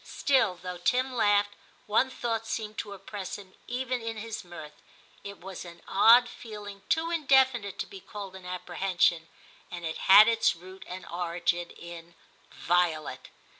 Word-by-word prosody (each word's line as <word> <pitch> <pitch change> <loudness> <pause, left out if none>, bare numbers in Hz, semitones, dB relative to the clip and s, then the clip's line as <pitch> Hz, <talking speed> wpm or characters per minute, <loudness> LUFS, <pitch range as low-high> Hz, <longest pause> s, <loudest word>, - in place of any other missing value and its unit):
Still, 265 - +2
though 180 -1 -6
Tim 255 +8 +1
laughed, 205 -3 +3 0.3
one 220 +5 +2
thought 230 -3 -3
seemed 215 -1 -4
to 205 - -5
oppress 200 0 -7
him 190 -2 -14
even 250 0 -2
in 225 -1 -4
his 220 0 -6
mirth; 165 -4 -11 0.4
it 200 0 -8
was 190 0 -8
an 170 -1 -12
odd 235 +5 +6
feeling 205 -4 -9
too 330 +1 +1
indefinite 265 - +3
to - - -3
be 195 - -11
called 195 0 -9
an 190 - -11
apprehension, 180 -2 0 0.4
and 175 -1 -7
it 160 - -4
had 205 +3 +10
its 230 -6 +3
root 185 +3 -12
and 185 +1 -7
origin 175 0 -2
in 170 0 -11 0.3
Violet. 170 -3 0
200 Hz, 155 wpm, -28 LUFS, 175-230 Hz, 0.4 s, had